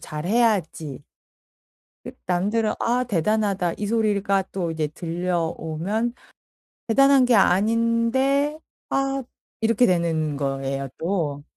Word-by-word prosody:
잘해야지. 170 Hz, -, -1 dB, 1.0 s
그 -, -, -7 dB
남들은 205 Hz, +5 st, 0 dB
"아 245 Hz, +2 st, +1 dB
대단하다." 200 Hz, -3 st, 0 dB
이 210 Hz, -, -3 dB
소리가 205 Hz, -3 st, +1 dB
또 175 Hz, -4 st, -2 dB
이제 155 Hz, -1 st, -1 dB
들려오면 175 Hz, +5 st, -2 dB, 0.7 s
'대단한 275 Hz, +2 st, +5 dB
게 245 Hz, -, +3 dB
아닌데 230 Hz, +9 st, +2 dB, 0.3 s
아.' 270 Hz, 0 st, 0 dB, 0.4 s
이렇게 230 Hz, +2 st, +3 dB
되는 165 Hz, -4 st, 0 dB
거예요 135 Hz, 0 st, -3 dB
또. 160 Hz, -5 st, -2 dB
195 Hz, 215 characters per minute, -23 LUFS, 165-230 Hz, 1.0 s, 대단한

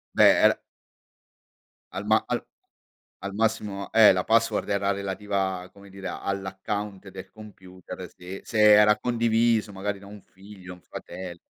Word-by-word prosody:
Beh, -, -, +6 dB
era -, -, -11 dB, 1.3 s
Al -, -, -5 dB
ma -, -, +3 dB
al -, -, -2 dB, 0.8 s
al 100 Hz, -, -5 dB
massimo, 105 Hz, -3 st, -2 dB
eh, 110 Hz, -1 st, +7 dB
la 90 Hz, -1 st, -1 dB
password 115 Hz, 0 st, +2 dB
era 100 Hz, 0 st, +1 dB
relativa 100 Hz, -1 st, -2 dB
a 90 Hz, -, -12 dB
come 100 Hz, +1 st, -17 dB
dire 95 Hz, 0 st, -8 dB
all'account 100 Hz, +1 st, -5 dB
del 95 Hz, 0 st, -10 dB
computer 95 Hz, -4 st, -11 dB
se 90 Hz, +2 st, -9 dB
se 115 Hz, -, -5 dB
era 105 Hz, 0 st, +6 dB
condiviso 115 Hz, -2 st, +1 dB
magari 100 Hz, +1 st, -4 dB
da 100 Hz, -, -14 dB
un 105 Hz, 0 st, -12 dB
figlio, 95 Hz, -1 st, -13 dB
un 90 Hz, -, -16 dB
fratel 90 Hz, -1 st, -9 dB
100 Hz, 145 wpm, -25 LUFS, 95-105 Hz, 1.3 s, eh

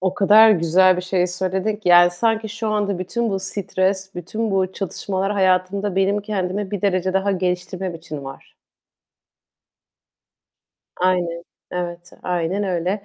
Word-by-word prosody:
O 185 Hz, 0 st, -1 dB
kadar 215 Hz, +3 st, +6 dB
güzel 185 Hz, 0 st, +4 dB
bir 180 Hz, -, -3 dB
şey 185 Hz, -1 st, 0 dB
söyledin 190 Hz, +3 st, -2 dB
ki 205 Hz, -4 st, -4 dB
yani 175 Hz, 0 st, +7 dB
sanki 220 Hz, +4 st, 0 dB
şu 225 Hz, 0 st, -4 dB
anda 205 Hz, -3 st, -1 dB
bütün 230 Hz, +5 st, -2 dB
bu 195 Hz, -, -1 dB
stres, 190 Hz, 0 st, -2 dB
bütün 215 Hz, +6 st, -4 dB
bu 190 Hz, -1 st, 0 dB
çatışmalar 195 Hz, +1 st, -3 dB
hayatımda 190 Hz, +1 st, +1 dB
benim 200 Hz, +2 st, +2 dB
kendimi 200 Hz, -1 st, -3 dB
bir 205 Hz, -, -3 dB
derece 185 Hz, -1 st, +1 dB
daha 195 Hz, +1 st, +1 dB
geliştirmem 180 Hz, 0 st, -3 dB
için 155 Hz, -4 st, -8 dB
var. 135 Hz, 0 st, -11 dB, 2.5 s
Aynen. 175 Hz, -2 st, 0 dB, 0.3 s
Evet, 175 Hz, -1 st, -5 dB
aynen 180 Hz, +2 st, -1 dB
öyle. 185 Hz, +2 st, -2 dB
190 Hz, 140 wpm, -21 LUFS, 180-200 Hz, 2.5 s, yani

